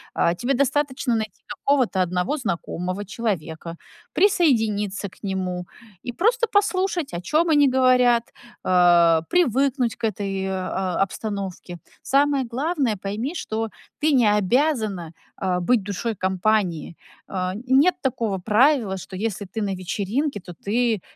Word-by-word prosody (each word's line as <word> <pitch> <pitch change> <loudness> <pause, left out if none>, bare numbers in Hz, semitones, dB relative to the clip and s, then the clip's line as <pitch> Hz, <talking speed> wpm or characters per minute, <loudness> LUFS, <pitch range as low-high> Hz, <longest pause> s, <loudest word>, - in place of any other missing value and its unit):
э, 170 - +2
тебе 250 +3 0
достаточно 275 -2 0
найти 220 -3 -4
какого-то 260 -9 +1
1 180 - 0
знакомого 185 - -3
человека, 170 -6 -4 0.4
присоединиться 220 - +2
к - - -21
нему- 185 -2 -3 0.4
и 245 - -4
просто 470 - +2
послушать, 375 - +1
о - - -2
чём 315 - +1
они 290 -2 +5
говорят, 250 -2 +4 0.4
э, - - 0 0.6
привыкнуть 270 -6 +2
к - - -2
этой, 195 -2 -3
э, 190 - -2 0.5
обстановке. 195 -3 -5 0.3
Самое 280 0 +2
главное: 275 -2 0
пойми, 210 - -4
что 225 -7 -3 0.3
ты 310 +1 +3
не 245 -5 +4
обязана, 215 - 0 0.3
э, 180 -1 +1
быть 220 +4 +2
душой 205 +3 -3
компании. 190 -3 0 0.3
Э, 185 -1 -2 0.2
нет 280 +8 +5
такого 230 -7 -1
правила, 220 0 +3
что 185 +1 -9
если 205 0 -3
ты 220 - -1
на 200 -2 -1
вечеринке, 205 - -2
то 175 0 -10
ты 225 -1 +1
220 Hz, 130 wpm, -23 LUFS, 190-275 Hz, 0.6 s, они